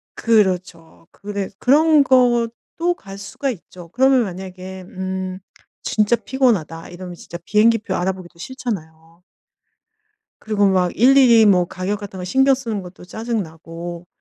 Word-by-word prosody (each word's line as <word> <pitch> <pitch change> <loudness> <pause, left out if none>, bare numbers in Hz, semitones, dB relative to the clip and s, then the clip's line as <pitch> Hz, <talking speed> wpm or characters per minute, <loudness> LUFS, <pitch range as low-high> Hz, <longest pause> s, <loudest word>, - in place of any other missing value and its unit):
그렇죠. 185 -7 0
그래 200 -1 -5
그런 300 +2 +5
것도 250 +7 +1
갈 195 -1 -11
수가 200 +8 -4
있죠. 175 -4 -12
그러면 260 +2 +3
만약에 185 0 -8
음 185 0 -5 0.4
진짜 215 +2 +2
피곤하다 215 - -1
이러면 180 0 -9
진짜 170 - -9
비행기 225 +1 +3
표 190 -3 -4
알아보기도 180 -2 -4
싫잖아요. 170 -9 -7 1.2
그리고 205 -2 +1
막 180 -2 +2
일일이 245 -2 +6
뭐 180 -3 +4
가격 190 +4 -4
같은 200 -2 -8
거 - - -5
신경 265 +8 +3
쓰는 230 -6 -3
것도 180 0 -12
짜증 225 +2 -3
나고 170 +2 -9
195 Hz, 285 characters per minute, -20 LUFS, 180-235 Hz, 1.2 s, 일일이